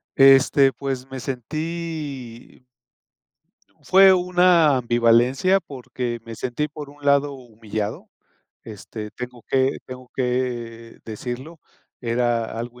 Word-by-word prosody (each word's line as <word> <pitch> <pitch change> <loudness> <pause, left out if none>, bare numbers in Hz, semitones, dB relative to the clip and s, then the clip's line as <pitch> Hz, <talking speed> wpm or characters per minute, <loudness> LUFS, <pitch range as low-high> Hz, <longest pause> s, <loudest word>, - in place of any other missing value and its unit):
Este, 135 0 +6
pues 135 -1 -5
me 130 - -6
sentí 140 -2 -6 1.1
fue 190 0 +6
una 180 -5 +4
ambivalencia 120 +9 +3
porque 125 -5 -6
me 115 -1 -9
sentí, 130 +6 -3
por 150 -1 -9
un 145 0 -17
lado, 140 0 +3
humillado, 110 -4 -6 0.5
este, 105 0 -8
tengo 125 -2 -8
que 135 0 +1
tengo 130 -1 -11
que 120 -3 -3
decirlo, 125 +8 -7 0.4
era 115 -1 -1
algo 120 +1 -7
130 Hz, 105 wpm, -22 LUFS, 120-145 Hz, 1.1 s, Este